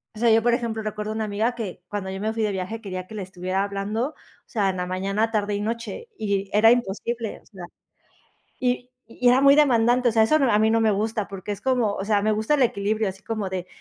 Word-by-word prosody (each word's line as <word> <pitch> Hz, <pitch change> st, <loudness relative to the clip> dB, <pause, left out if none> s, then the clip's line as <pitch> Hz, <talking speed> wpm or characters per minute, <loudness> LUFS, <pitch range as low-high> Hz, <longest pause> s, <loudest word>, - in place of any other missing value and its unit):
o -, -, -9 dB
sea, 235 Hz, 0 st, +4 dB
yo 225 Hz, +1 st, +5 dB
por 240 Hz, 0 st, +3 dB
ejemplo, 230 Hz, -2 st, -1 dB
recuerdo 215 Hz, 0 st, -4 dB
a -, -, -4 dB
una 220 Hz, -, -1 dB
amiga 215 Hz, +4 st, -1 dB
que 200 Hz, -6 st, -6 dB
cuando 200 Hz, -2 st, -4 dB
yo 190 Hz, 0 st, -5 dB
me 215 Hz, +2 st, -1 dB
fui 225 Hz, -1 st, -1 dB
de 210 Hz, -, +1 dB
viaje 195 Hz, +4 st, -4 dB
quería 185 Hz, -3 st, -6 dB
que 220 Hz, -, -10 dB
le 210 Hz, -, -4 dB
estuviera 185 Hz, +1 st, -2 dB
hablando, 205 Hz, +5 st, -2 dB
o 310 Hz, -, -18 dB, 0.3 s
sea, 205 Hz, -4 st, 0 dB
en 185 Hz, -, -3 dB
la 180 Hz, -, -2 dB
mañana, 195 Hz, +4 st, -1 dB
tarde 210 Hz, -2 st, 0 dB
y 205 Hz, -, -2 dB
noche, 230 Hz, -, -4 dB
y 200 Hz, -2 st, -1 dB
era 220 Hz, +2 st, +6 dB
imposible, 230 Hz, 0 st, -2 dB
o -, -, -31 dB
sea, 185 Hz, -4 st, -10 dB, 1.0 s
y 250 Hz, 0 st, 0 dB, 0.2 s
y 235 Hz, +2 st, 0 dB
era 250 Hz, +2 st, +5 dB
muy 280 Hz, 0 st, +7 dB
demandante, 245 Hz, -3 st, +4 dB
o 230 Hz, -, +1 dB
sea, 225 Hz, -, +4 dB
eso 305 Hz, +8 st, +4 dB
a 255 Hz, -8 st, +3 dB
mí 220 Hz, -, +3 dB
no 225 Hz, 0 st, +3 dB
me 220 Hz, -1 st, +3 dB
gusta 215 Hz, +1 st, -1 dB
porque 195 Hz, +1 st, -5 dB
es 200 Hz, -, -7 dB
como, 250 Hz, -5 st, +1 dB
o 195 Hz, -, -3 dB
sea, 205 Hz, -1 st, +2 dB
me 215 Hz, +1 st, +2 dB
gusta 215 Hz, +7 st, +1 dB
el 275 Hz, -, +3 dB
equilibrio, 215 Hz, -1 st, +1 dB
así 190 Hz, +1 st, -8 dB
como 215 Hz, -4 st, -3 dB
de, 185 Hz, -1 st, -4 dB
215 Hz, 255 wpm, -24 LUFS, 200-230 Hz, 1.0 s, muy